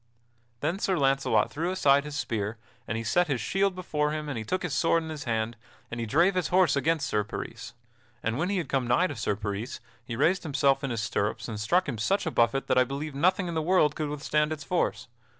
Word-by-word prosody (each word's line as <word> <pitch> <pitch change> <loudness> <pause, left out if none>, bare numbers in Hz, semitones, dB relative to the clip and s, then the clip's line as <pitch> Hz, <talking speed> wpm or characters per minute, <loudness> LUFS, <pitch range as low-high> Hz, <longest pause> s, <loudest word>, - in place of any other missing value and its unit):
Then 165 +6 -1
Sir 190 -3 +1
Launcelot 135 -6 +2
threw 165 +4 -2
aside 140 -6 +3
his 150 -1 -6
spear, 110 -4 -2 0.3
and 115 - -2
he 115 - -3
set 175 +10 +2
his 135 -5 0
shield 195 - +1
before 150 -5 -1
him 150 0 -3
and 140 - -3
he 110 - -3
took 185 +12 -2
his 170 -6 -2
sword 165 +5 +2
in 160 - -7
his 155 -2 -6
hand, 115 -1 -1 0.4
and 120 - -4
he 115 - -2
drave 170 - +4
his 185 -2 0
horse 180 -6 +4
against 155 +1 +1
Sir 105 0 0
Peris. 105 - -7 0.5
And 115 0 0
when 175 +4 0
he 200 - 0
had 170 -6 -2
come 130 -2 0
nigh 120 +10 +3
to 145 - -3
Sir 105 -2 -1
Peris 105 +4 -4 0.2
he 120 -1 -5
raised 170 +9 +2
himself 140 -3 +1
in 135 - -1
his 115 -3 -2
stirrups 105 -1 -1
and 110 -3 -5
struck 175 - +2
him 120 -6 -3
such 195 - +1
a 160 - -1
buffet 120 +2 +2
that 130 -1 +3
I - - +6
believe 140 +3 -5
nothing 185 +6 +2
in 170 - -3
the 160 - 0
world 155 -3 +3
could 155 -2 -2
withstand 150 +1 0
its 155 -2 -4
force. 180 +4 -1
145 Hz, 240 wpm, -28 LUFS, 120-170 Hz, 0.5 s, I